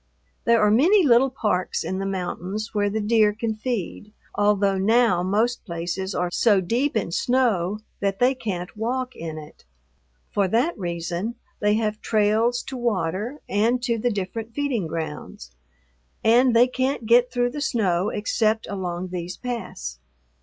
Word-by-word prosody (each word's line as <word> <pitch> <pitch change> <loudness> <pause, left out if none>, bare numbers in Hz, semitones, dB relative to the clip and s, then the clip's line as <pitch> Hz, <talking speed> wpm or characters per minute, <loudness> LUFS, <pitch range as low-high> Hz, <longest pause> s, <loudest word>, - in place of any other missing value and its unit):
There 235 0 +4
are 210 - +4
many 350 - +5
little 260 -1 +5
parks 210 -8 -1
in 190 - -3
the 195 - -2
mountains 190 +3 -4
where 205 -1 +1
the 215 +2 -2
deer 215 0 +3
can 225 +1 -2
feed, 215 -2 -4 0.2
although 200 -2 +2
now 220 -2 +3
most 215 +6 0
places 175 +1 -4
are 175 0 -1
so 205 +1 +3
deep 235 +8 0
in 195 -5 -2
snow 210 -3 +1 0.2
that 195 -1 -1
they 250 +4 +3
can't 190 -8 -5
walk 250 +4 -2
in 160 -1 -6
it. 150 -1 -12 0.7
For 200 -2 +1
that 245 - +1
reason 175 +4 -3 0.2
they 210 0 +2
have 215 -1 -1
trails 220 +3 +2
to 265 - -7
water 215 - -2
and 225 +5 +2
to 235 -2 0
the 245 - +1
different 220 +2 -4
feeding 270 - -1
grounds, 155 - -6 0.7
and 240 +2 +4
they 235 +2 +7
can't 255 -1 -2
get 240 +2 +4
through 245 -1 0
the 295 - -5
snow 190 -8 +1
except 220 +1 0
along 185 -2 -4
these 180 0 -5
paths. 65 - -5
215 Hz, 155 wpm, -24 LUFS, 185-240 Hz, 0.7 s, they